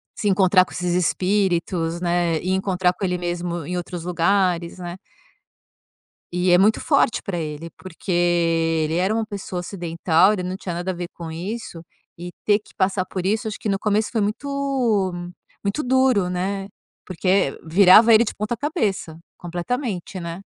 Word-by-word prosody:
Se 210 Hz, -, -1 dB
encontrar 185 Hz, -1 st, +5 dB
com -, -, -13 dB
esses 180 Hz, -1 st, -2 dB
espíritos, 180 Hz, -2 st, 0 dB
né, 175 Hz, -2 st, +1 dB
e 185 Hz, -, -2 dB
encontrar 190 Hz, -1 st, +1 dB
com 195 Hz, -, -9 dB
ele 180 Hz, -1 st, 0 dB
mesmo 175 Hz, -1 st, -3 dB
em 180 Hz, -, -4 dB
outros 175 Hz, -1 st, -5 dB
lugares, 180 Hz, -1 st, +1 dB
né. 175 Hz, -1 st, -6 dB, 1.4 s
E 180 Hz, +1 st, +1 dB
é 175 Hz, -, +7 dB
muito 210 Hz, +4 st, +3 dB
forte -, -, +2 dB
para 195 Hz, -4 st, -3 dB
ele, 155 Hz, 0 st, -5 dB
porque 185 Hz, +1 st, -7 dB
ele 165 Hz, -2 st, +1 dB
era 185 Hz, +4 st, +1 dB
uma 225 Hz, 0 st, 0 dB
pessoa 200 Hz, -4 st, -5 dB
ocidental, 175 Hz, +1 st, +2 dB
ele 185 Hz, -3 st, -3 dB
não 185 Hz, +1 st, -4 dB
tinha 180 Hz, -3 st, -5 dB
nada 175 Hz, +2 st, -2 dB
a -, -, -4 dB
ver 175 Hz, 0 st, -5 dB
com 165 Hz, -2 st, -7 dB
isso 180 Hz, +1 st, -6 dB, 0.4 s
e 175 Hz, +1 st, -7 dB
ter 205 Hz, 0 st, +3 dB
que 210 Hz, -, -21 dB
passar 190 Hz, 0 st, +1 dB
por 185 Hz, -1 st, -5 dB
isso, 220 Hz, +4 st, 0 dB
acho 215 Hz, -, -4 dB
que 215 Hz, -, -4 dB
no 195 Hz, -1 st, 0 dB
começo 210 Hz, +1 st, 0 dB
foi 230 Hz, -, 0 dB
muito 240 Hz, -4 st, 0 dB, 0.5 s
muito 200 Hz, +9 st, -1 dB
duro, 255 Hz, -7 st, +3 dB
né, 195 Hz, +2 st, -2 dB, 0.4 s
porque 185 Hz, -3 st, +1 dB
virava 190 Hz, +7 st, +7 dB
ele 220 Hz, +1 st, +7 dB
de -, -, -4 dB
ponta-cabeça, 215 Hz, -, -2 dB, 0.2 s
completamente, 185 Hz, +2 st, -4 dB
né. 170 Hz, +1 st, -6 dB
185 Hz, 165 wpm, -22 LUFS, 175-205 Hz, 1.4 s, é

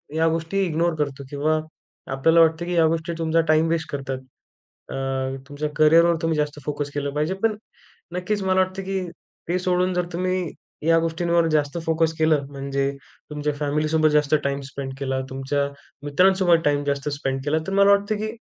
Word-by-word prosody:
या 160 Hz, +1 st, +3 dB
गोष्टी 165 Hz, +4 st, -1 dB
इग्नोर 170 Hz, 0 st, 0 dB
करतो. 140 Hz, -1 st, -2 dB
किंवा 155 Hz, +2 st, +1 dB, 0.5 s
आपल्याला 160 Hz, +5 st, +4 dB
वाटतं 165 Hz, +1 st, +3 dB
की 180 Hz, -, -3 dB
या 165 Hz, -1 st, +5 dB
गोष्टी 165 Hz, +1 st, -1 dB
तुमचा 165 Hz, 0 st, +2 dB
टाइम 155 Hz, +1 st, +4 dB
वेस्ट 165 Hz, -1 st, -1 dB
करतात. 135 Hz, -2 st, -3 dB, 0.7 s
अ, -, -, -4 dB, 0.5 s
तुमच्या 150 Hz, +1 st, -3 dB
करिअरवर 165 Hz, +2 st, +5 dB
तुम्ही 165 Hz, -1 st, 0 dB
जास्त 150 Hz, 0 st, -1 dB
फोकस 145 Hz, -1 st, -3 dB
केलं 140 Hz, -1 st, -2 dB
पाहिजे. 155 Hz, +5 st, 0 dB
पण 220 Hz, -2 st, +2 dB, 0.6 s
नक्कीच 200 Hz, +3 st, -1 dB
मला 190 Hz, 0 st, +2 dB
वाटतं 185 Hz, +1 st, -2 dB
की 195 Hz, 0 st, -2 dB, 0.5 s
ते 180 Hz, +1 st, +1 dB
सोडून 180 Hz, 0 st, +1 dB
जर 180 Hz, -1 st, +1 dB
तुम्ही 185 Hz, 0 st, -1 dB, 0.4 s
या 165 Hz, 0 st, +5 dB
गोष्टींवर 170 Hz, 0 st, +1 dB
जास्त 150 Hz, 0 st, 0 dB
फोकस 160 Hz, 0 st, +1 dB
केलं 155 Hz, -3 st, +2 dB
म्हणजे 140 Hz, 0 st, -2 dB, 0.4 s
तुमच्या 150 Hz, 0 st, -2 dB
फॅमिलीसोबत 155 Hz, +2 st, +2 dB
जास्त 150 Hz, 0 st, +2 dB
टाइम 140 Hz, 0 st, -1 dB
स्पेंड 135 Hz, 0 st, -5 dB
केला, 135 Hz, -1 st, -1 dB
तुमच्या 135 Hz, +2 st, -1 dB, 0.4 s
मित्रांसोबत 180 Hz, +2 st, +4 dB
टाइम 145 Hz, -1 st, +2 dB
जास्त 140 Hz, 0 st, -1 dB
स्पेंड 135 Hz, -2 st, -2 dB
केला 155 Hz, +2 st, +1 dB
तर 195 Hz, -, -2 dB
मला 200 Hz, 0 st, +5 dB
वाटतं 200 Hz, +1 st, +2 dB
की 215 Hz, +1 st, -3 dB
160 Hz, 170 wpm, -23 LUFS, 145-175 Hz, 0.7 s, या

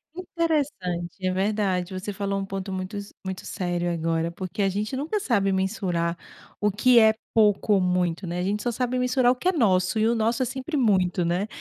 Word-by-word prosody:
Interessante, 275 Hz, -, -2 dB
é 185 Hz, -, +2 dB
verdade. 190 Hz, -2 st, 0 dB
Você 190 Hz, +2 st, -4 dB
falou 195 Hz, 0 st, -2 dB
um 195 Hz, -, -3 dB
ponto 195 Hz, 0 st, -5 dB
muito 185 Hz, +2 st, -4 dB
s 200 Hz, 0 st, -8 dB
muito 190 Hz, -1 st, -5 dB
sério 175 Hz, -2 st, -2 dB
agora, 165 Hz, 0 st, -1 dB
porque 185 Hz, +3 st, -5 dB
a 195 Hz, -, +3 dB
gente 210 Hz, +6 st, -3 dB
nunca 310 Hz, +10 st, -1 dB
sabe 200 Hz, -, +1 dB
mensurar 190 Hz, -3 st, -1 dB, 0.5 s
o 210 Hz, 0 st, +2 dB
que 240 Hz, +4 st, +5 dB
é 220 Hz, -1 st, +6 dB, 0.2 s
pouco 210 Hz, -1 st, +3 dB
ou 195 Hz, -, +4 dB
muito, 180 Hz, 0 st, 0 dB
né? 175 Hz, +1 st, -3 dB
A -, -, -1 dB
gente 205 Hz, +2 st, -1 dB
só 240 Hz, -, -1 dB
sabe 250 Hz, +1 st, -1 dB
mensurar 250 Hz, 0 st, +3 dB
o -, -, 0 dB
que 260 Hz, -, -3 dB
é -, -, +4 dB
nosso, 185 Hz, -, +2 dB
e 215 Hz, +1 st, +3 dB
o 230 Hz, -, +3 dB
nosso 230 Hz, +2 st, +1 dB
é -, -, 0 dB
sempre 265 Hz, +5 st, -4 dB
muito, 185 Hz, -7 st, +2 dB
né. 175 Hz, +4 st, 0 dB
195 Hz, 210 wpm, -25 LUFS, 185-230 Hz, 0.5 s, é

